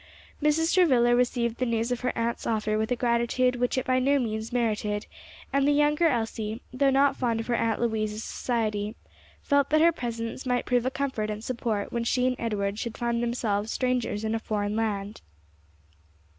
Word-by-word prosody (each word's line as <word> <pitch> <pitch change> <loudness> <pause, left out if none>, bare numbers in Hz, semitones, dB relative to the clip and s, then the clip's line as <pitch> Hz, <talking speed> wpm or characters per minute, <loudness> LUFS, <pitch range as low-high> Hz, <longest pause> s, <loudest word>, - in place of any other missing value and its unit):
Mrs. 310 +2 +2
Travilla 255 -10 +4
received 240 -1 0
the 255 - +1
news 230 +1 0
of 245 - -1
her 250 - -1
aunt's 235 +1 -2
offer 215 -1 0
with 220 +2 -1
a - - +3
gratitude 240 +1 +1
which 245 +1 0
it 260 - 0
by 255 0 +2
no 280 +2 +3
means 220 -3 -2
merited, 215 -3 -1 0.5
and 275 0 +3
the - - +5
younger 295 +3 +3
Elsie, 225 -4 -2
though 275 +2 +3
not 275 +1 +3
fond 235 -3 0
of 225 - -3
her 245 - -1
Aunt 225 -2 0
Louise's 220 -2 -1
society, 215 -3 -2 0.5
felt 285 -1 +2
that 310 - +4
her 335 +1 +6
presence 230 -3 -4
might 250 -1 0
prove 245 0 +1
a - - +3
comfort 260 -6 -2
and 215 +1 -5
support 230 -4 -2
when 235 -1 -1
she 250 +2 +1
and 255 0 +1
Edward 205 -2 -2
should 235 -2 -4
find 235 -1 -1
themselves 225 -3 -1
strangers 250 -4 -1
in 220 0 -1
a 225 - 0
foreign 210 -1 -2
land. 210 -2 -2
235 Hz, 190 wpm, -27 LUFS, 220-255 Hz, 0.5 s, her